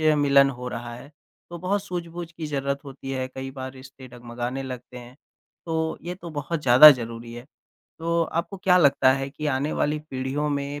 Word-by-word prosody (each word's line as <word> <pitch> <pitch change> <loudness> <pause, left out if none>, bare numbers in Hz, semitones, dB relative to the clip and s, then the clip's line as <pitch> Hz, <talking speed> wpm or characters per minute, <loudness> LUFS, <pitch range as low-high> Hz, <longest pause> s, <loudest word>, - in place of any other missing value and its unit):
मिलन 145 -3 +4
हो 125 -1 -6
रहा 120 0 -6
है, 125 +4 -12 0.4
तो 170 - -7
बहुत 195 +3 -1
सूझबूझ 175 -2 -6
की 165 -2 -6
ज़रूरत 140 -1 -2
होती 135 -1 -8
है, 130 -1 -2
कई 130 0 -7
बार 130 -1 -7
रिश्ते 130 0 -13
डगमगाने 120 +2 -5
लगते 125 -1 -8
हैं, 120 +1 -13 0.5
तो 160 -1 -2
ये 175 +1 -5
तो 175 -2 -9
बहुत 150 +2 -3
ज़्यादा 130 +4 +10
ज़रूरी 115 -3 -3
है। 120 +1 -10 0.5
तो 170 +1 +1
आपको 170 +5 -3
क्या 185 -1 +3
लगता 140 -4 +5
है 135 0 -2
कि 150 +1 -5
आने 145 +1 0
वाली 150 +1 0
पीढ़ियों 135 +3 -2
में 145 0 -3
140 Hz, 190 wpm, -25 LUFS, 130-160 Hz, 0.5 s, ज़्यादा